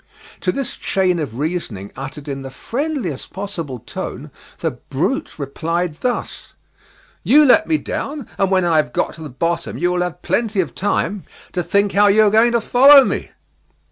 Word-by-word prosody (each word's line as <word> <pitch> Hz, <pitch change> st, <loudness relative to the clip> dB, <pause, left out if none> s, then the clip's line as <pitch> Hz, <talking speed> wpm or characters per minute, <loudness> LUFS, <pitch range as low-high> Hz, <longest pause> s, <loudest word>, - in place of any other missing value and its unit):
To 180 Hz, -, 0 dB
this 275 Hz, +6 st, -4 dB
chain 185 Hz, -2 st, +1 dB
of 130 Hz, -7 st, -4 dB
reasoning 140 Hz, -, -4 dB
uttered 135 Hz, +2 st, -8 dB
in 135 Hz, -1 st, -4 dB
the 135 Hz, -, -7 dB
friendliest 240 Hz, -, -4 dB
possible 185 Hz, -9 st, -5 dB
tone, -, -, -7 dB, 0.3 s
the -, -, 0 dB
brute -, -, -3 dB
replied 165 Hz, +4 st, -3 dB
thus: 250 Hz, -1 st, -4 dB, 0.7 s
"You 300 Hz, +2 st, +6 dB
let 320 Hz, +5 st, +5 dB
me 320 Hz, -, +2 dB
down, 290 Hz, -2 st, -5 dB
and 195 Hz, -1 st, +2 dB
when 185 Hz, -2 st, +2 dB
I 165 Hz, -2 st, +3 dB
have 150 Hz, -6 st, +1 dB
got -, -, -1 dB
to 165 Hz, -, -12 dB
the 155 Hz, -, -7 dB
bottom 165 Hz, +6 st, -2 dB
you 175 Hz, +1 st, +1 dB
will 180 Hz, 0 st, 0 dB
have 180 Hz, -4 st, -4 dB
plenty 210 Hz, +3 st, 0 dB
of 185 Hz, -, -1 dB
time 205 Hz, 0 st, -1 dB, 0.3 s
to 180 Hz, -, -1 dB
think 200 Hz, +2 st, +1 dB
how 205 Hz, +1 st, +4 dB
you 210 Hz, +2 st, +5 dB
are 210 Hz, -, +4 dB
going 230 Hz, +2 st, +4 dB
to 235 Hz, -, +2 dB
follow 270 Hz, +4 st, +7 dB
me." -, -, -3 dB
180 Hz, 180 wpm, -19 LUFS, 155-225 Hz, 0.7 s, follow